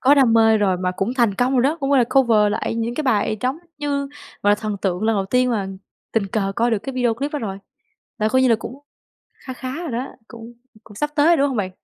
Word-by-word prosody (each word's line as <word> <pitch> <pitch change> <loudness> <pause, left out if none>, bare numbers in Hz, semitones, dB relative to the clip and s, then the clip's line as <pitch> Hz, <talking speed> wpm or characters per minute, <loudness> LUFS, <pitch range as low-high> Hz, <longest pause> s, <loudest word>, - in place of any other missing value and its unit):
có 275 +2 +5
đam 265 -5 +4
mê 225 -1 +5
rồi 195 -3 +2
mà 180 0 -1
cũng 195 +6 -2
thành 235 -6 +2
công 245 +4 +1
rồi 245 - +3
đó, 290 +5 +1
cũng, 275 0 -1
gọi 280 - +5
là, 245 - +4
cover 225 -6 +4
lại 225 +1 -2
những 230 +1 -2
cái 310 - -2
bài 215 -5 +1
trống 260 +5 -1 0.2
như, 290 -1 -1 0.4
gọi 205 - +3
là, - - +6
thần 210 -1 -4
tượng 185 -1 -1
lần 220 0 +2
đầu 195 - 0
tiên 250 +4 +2
mà 200 -5 -1 0.4
tình 220 -3 +1
cờ 195 -1 -2
coi 235 +1 +2
được 225 - +1
cái 270 +6 -7
video 245 -3 +1
clip 280 +6 -4
đó 295 - -2
rồi. 195 -6 -5 0.6
Là 215 - +1
coi 260 +3 +2
như 260 - +4
là 230 - +4
cũng 245 +4 -8 0.6
kha 260 - -9
khá 255 +1 -6
rồi 315 - -5
đó, 245 +3 -3 0.2
cũng 230 0 -11 0.3
cũng 210 - -15
sắp 295 +7 -2
tới 290 0 +3
rồi, 340 0 +5
đúng 280 0 +2
không 260 - -3
bạn? 190 -3 -1
235 Hz, 275 wpm, -21 LUFS, 210-265 Hz, 0.6 s, là